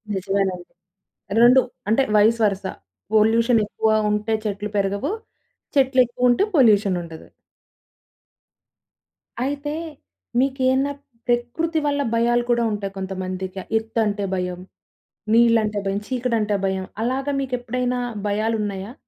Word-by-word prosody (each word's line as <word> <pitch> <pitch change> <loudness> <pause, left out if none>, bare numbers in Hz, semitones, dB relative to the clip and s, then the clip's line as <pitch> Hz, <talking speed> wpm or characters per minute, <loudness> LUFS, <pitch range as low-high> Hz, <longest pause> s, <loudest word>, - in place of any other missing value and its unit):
నిజమేనండి. 190 -2 -2 0.7
2 250 +2 +7 0.3
అంటే 225 +5 +3
vice 220 +3 +4
versa 195 -2 -1 0.4
pollution 225 +2 +4
ఎక్కువ 220 +1 0 0.2
ఉంటే 210 +1 0
చెట్లు 205 0 -3
పెరగవు, 200 - 0 0.7
చెట్లు 265 -1 +4
ఎక్కువ 250 +1 0
ఉంటే 245 +11 +3
పొల్యూషన్ 205 -7 +4
ఉండదు. 165 -1 -10 2.2
అయితే, 290 +2 -3 0.7
మీకేన్నా 265 +1 +1 0.4
ప్రకృతి 245 +8 0
వల్ల 285 0 +1
భయాలు 240 +1 +2
కూడా 235 -1 +3
ఉంటాయి. 200 -2 -4
కొంతమందికి 190 0 -4 0.2
ఎత్తంటే 220 -2 -1
భయం, 180 -1 -3 0.7
నీళ్ళంటే 225 -3 +4
భయం, 195 +1 -1
చీకటంటే 235 -5 0
భయం 190 -1 -1 0.2
అలాగా 265 +4 -1
మీకు 260 -2 -5
ఎప్పుడైనా 250 +1 -2 0.3
భయాలున్నాయా? 210 -1 -2
225 Hz, 105 wpm, -22 LUFS, 200-250 Hz, 2.2 s, 2